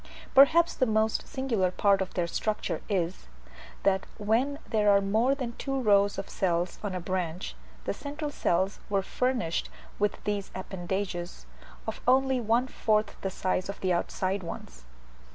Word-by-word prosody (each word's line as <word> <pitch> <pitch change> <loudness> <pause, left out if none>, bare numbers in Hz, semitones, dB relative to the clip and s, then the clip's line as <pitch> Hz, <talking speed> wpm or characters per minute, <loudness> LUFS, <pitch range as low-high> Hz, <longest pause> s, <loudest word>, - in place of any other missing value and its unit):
Perhaps 325 +5 +6
the 255 - +1
most 220 0 +1
singular 235 -9 0
part 195 +1 +3
of 190 - -4
their 175 -3 +1
structure 215 +5 -2
is, 185 -3 -1 0.6
that 190 -1 +2
when 230 +7 +1
there 210 -2 +2
were 200 - +6
more 220 +7 +2
than 255 -4 -4
two 270 -1 -1
rows 205 -4 +4
of 195 - -4
cells 175 -1 -1
on 200 -3 -2
a - - -1
branch, 180 - -3 0.3
the - - 0
central 295 +1 -5
cells 190 -4 0
were 200 -1 +1
furnished 245 -6 -1 0.3
with 205 0 +1
these 205 -2 -2
appendages, 185 - -4 0.4
of - - -5
only 265 0 +4
one 230 +3 +2
fourth 215 -4 +1
the 195 - -1
size 185 0 -1
of 200 - -5
the 185 -1 +2
outside 185 +3 -1
ones. 65 - -8
200 Hz, 155 wpm, -29 LUFS, 185-235 Hz, 0.6 s, Perhaps